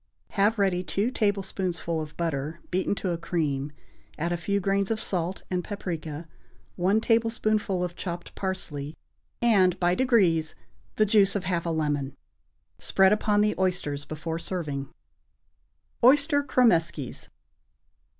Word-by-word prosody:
Have 210 +3 +2
ready 190 -3 +1
two 205 +6 -1
tablespoonfuls 190 -6 -1
of 150 - -24
butter 160 -1 -2
beaten 185 +2 0
to 190 -2 -2
a 170 - -2
cream; 150 -5 -1 0.5
add 170 +3 -1
a - - +1
few 200 +4 -1
grains 195 0 0
of 225 -1 0
salt 180 -3 -2
and 180 -1 0
paprica, 165 -6 -5 0.5
one 190 +4 +2
tablespoonful 220 -4 +1
of 175 -1 -4
chopped 175 -2 -6
parsley, 160 -6 -4 0.5
and, 190 -6 +4
by 175 -1 +3
degrees, 185 -10 +2 0.4
the 215 - +4
juice 200 -1 +4
of 200 - -1
half 175 -2 -1
a - - +1
lemon. 145 -4 -1 0.6
Spread 190 +1 +4
upon 210 -1 +2
the 210 0 +2
oysters 175 -6 0
before 160 +2 -5
serving. 150 -6 -4 1.1
=Oyster 285 +3 +5
Cromeskies. 170 - +1
180 Hz, 130 wpm, -27 LUFS, 165-205 Hz, 1.1 s, =Oyster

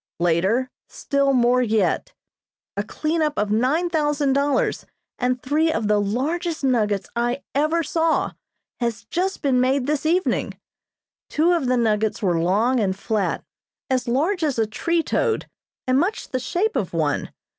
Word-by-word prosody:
Later 190 +10 +1 0.2
Still 280 -1 0
more 250 -1 +3
yet. 225 - +1 0.6
A - - 0
cleanup 310 -1 -1
of 210 0 0
nine 260 +11 +2
thousand 295 -4 +1
dollars 280 -1 0 0.3
and 250 0 0
three 310 +4 +2
of 225 -8 -1
the 210 0 +3
largest 310 - -2
nuggets 210 -7 +1
I 240 +3 -1
ever 310 +4 +1
saw 325 +1 +1 0.5
has 230 -2 -2
just 375 +1 -1
been 260 -3 +3
made 260 +1 +2
this 295 0 -1
evening. 360 +3 0 0.7
Two 325 +3 +2
of 335 -7 +1
the 255 0 +2
nuggets 220 -2 +1
were 175 -5 +1
long 215 +9 +2
and 190 -3 0
flat, 210 0 -1 0.5
as 255 -1 0
large 320 +9 +1
as 290 -5 0
a 225 - +2
tree 335 +10 -1
toad, 455 +5 0 0.4
and 255 0 +3
much 390 +8 -1
the 255 - -1
shape 355 - -1
of 185 -4 -2
one. 150 -3 0
260 Hz, 155 wpm, -22 LUFS, 220-315 Hz, 0.7 s, more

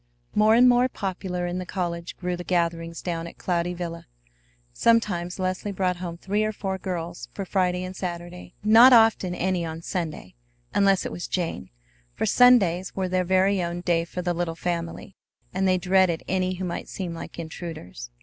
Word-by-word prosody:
More 215 +1 +5
and 250 +2 +7
more 250 +1 +4
popular 185 -4 -3
in 175 +1 -3
the - - -3
college 175 -2 -4
grew 180 -1 -2
the 175 - -6
gatherings 170 -2 -1
down 170 -2 -3
at - - -12
Cloudy 175 0 -1
Villa. 170 -1 -6 0.7
Sometimes 180 - +1
Leslie 185 +2 -2
brought 185 -2 0
home 175 -1 -6
three 205 +4 -1
or 215 - 0
four 190 -2 -4
girls 170 -10 -5
for 195 - -4
Friday 180 -1 0
and 185 0 -6
Saturday, 175 0 -6
not 230 +4 +8
often 225 -6 +4
any 180 -1 0
on 165 0 -6
Sunday, 160 - -4 0.4
unless 195 -2 +3
it - - -3
was 175 - -5
Jane; 170 - -3 0.5
for - - -1
Sundays 190 -8 +4
were 190 -1 -1
their 185 0 +1
very 190 +1 +2
own 175 0 -3
day 170 -2 +1
for 180 +2 -6
the 175 -1 0
little 170 -1 -2
family, 170 +2 -4 0.4
and 190 +1 +1
they 185 0 +3
dreaded 180 -2 +2
any 185 0 0
who 185 +1 -4
might 170 - -5
seem 180 -3 -4
like 165 - -8
intruders. 160 - -7
180 Hz, 180 wpm, -25 LUFS, 170-190 Hz, 0.7 s, not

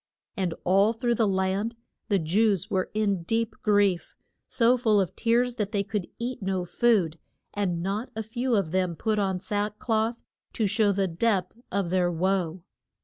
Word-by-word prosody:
And 185 -5 -1
all 195 +4 +4
through 240 +1 0
the 225 -2 +2
land 195 +4 0 0.3
the 200 - +3
Jews 190 +3 +1
were 185 -2 0
in 200 -4 +1
deep 225 +6 -1
grief, 205 -4 +2 0.3
so 235 +1 +3
full 220 -4 +3
of 190 -4 -1
tears 240 +1 +1
that 210 -1 -2
they 200 -1 +1
could 200 -2 -3
eat 245 0 -4
no 190 -2 -1
food; 180 -6 +2 0.3
and 180 -4 -1
not 205 +6 -2
a 220 - -3
few 240 +3 -1
of 195 -6 0
them 185 -2 0
put 215 +4 0
on 190 -2 0
sack 205 +2 -2
cloth 225 +1 -1 0.3
to 220 - 0
show 205 +1 +3
the 195 -1 +1
depth 185 +2 0 0.2
of 190 -3 -1
their 180 -1 +2
woe. 180 0 -1
200 Hz, 175 wpm, -27 LUFS, 185-225 Hz, 0.3 s, all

